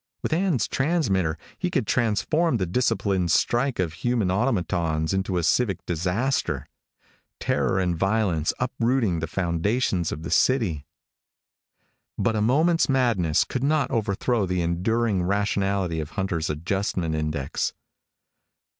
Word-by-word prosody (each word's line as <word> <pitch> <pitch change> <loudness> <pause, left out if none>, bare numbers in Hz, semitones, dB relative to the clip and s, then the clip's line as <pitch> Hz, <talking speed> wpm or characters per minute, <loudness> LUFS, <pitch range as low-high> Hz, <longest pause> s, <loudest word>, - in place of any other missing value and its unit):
With - - -1
Ann's 165 - +1
transmitter 105 - 0 0.2
he 180 - -1
could 140 - 0
transform 120 - +1
the 95 - -1
disciplined 95 -3 0
strike 120 - +2
of 85 -4 -1
human 115 0 0
automatons 85 -7 0
into 95 -1 -1
a 85 - 0
civic 100 +1 +1
disaster. 90 - -1 0.7
Terror 95 - 0
and 90 -2 0
violence 95 -3 +1
uprooting 120 -7 0
the 80 - -3
foundations 90 +2 0
of 80 - -5
the 85 - -5
city. 95 - +2 1.3
But 115 - +1
a 105 - 0
moment's 155 +10 +3
madness 115 - +2
could 130 - -4
not 150 0 +1
overthrow 110 -1 0
the 90 -1 0
enduring 100 +4 0
rationality 100 -2 0
of 75 -1 -4
Hunter's 90 -5 -1
adjustment 85 +1 -2
index. 75 -3 -2
95 Hz, 125 wpm, -25 LUFS, 85-120 Hz, 1.3 s, moment's